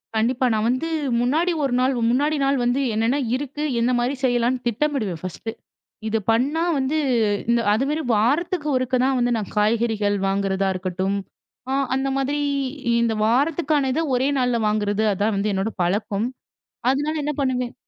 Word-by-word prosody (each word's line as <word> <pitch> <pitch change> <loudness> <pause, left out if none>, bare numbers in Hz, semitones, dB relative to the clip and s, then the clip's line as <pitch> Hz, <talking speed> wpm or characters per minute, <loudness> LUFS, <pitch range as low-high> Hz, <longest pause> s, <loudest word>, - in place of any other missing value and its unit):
கண்டிப்பா. 240 +4 +1
நான் 215 +1 +1
வந்து 255 +6 0 0.3
முன்னாடி 310 +9 +1
ஒரு 270 -3 0
நாள் 260 +2 +2 0.2
முன்னாடி 290 +5 +1
நாள் 275 0 +2
வந்து 245 +3 +1
என்னென்ன 225 +5 +1 0.2
இருக்கு 290 +2 -4 0.2
என்ன 235 +2 +2
மாரி 245 +3 0
செய்யலான்னு 245 0 +1
திட்டமிடுவேன் 235 - -1
ஃபர்ஸ்ட்டு. 185 +5 -5 0.6
இத 220 0 0
பண்ணா 275 +8 +1 0.2
வந்து 270 +3 0 0.5
இந்த 235 0 +3
அதுமாரி 275 +8 0
வாரத்துக்கு 300 - +1
ஒருக்க 255 0 -1
தான் 265 0 +2
வந்து 245 0 +1
நான் 210 -3 -4
காய்கறிகள் 215 -1 +1
வாங்குறதா 195 0 0
இருக்கட்டும். 185 +1 -2 0.5
ஆ - - 0 0.2
அந்த 265 +1 0
மாதிரி 275 +2 0 0.6
இந்த 230 -1 +1
வாரத்துக்கான 290 +3 +1
இத 315 - 0
ஒரே 255 +2 +2
நாள்ல 250 -2 +1
வாங்குறது 210 0 0
அதான் 205 +3 0
வந்து 200 +2 0
என்னோட 195 +3 -1
பழக்கம். 200 +4 0 0.6
அதுனால 290 +4 0
என்ன 295 - -1
பண்ணுவேன் 250 -2 -1
245 Hz, 150 wpm, -22 LUFS, 215-275 Hz, 0.6 s, இந்த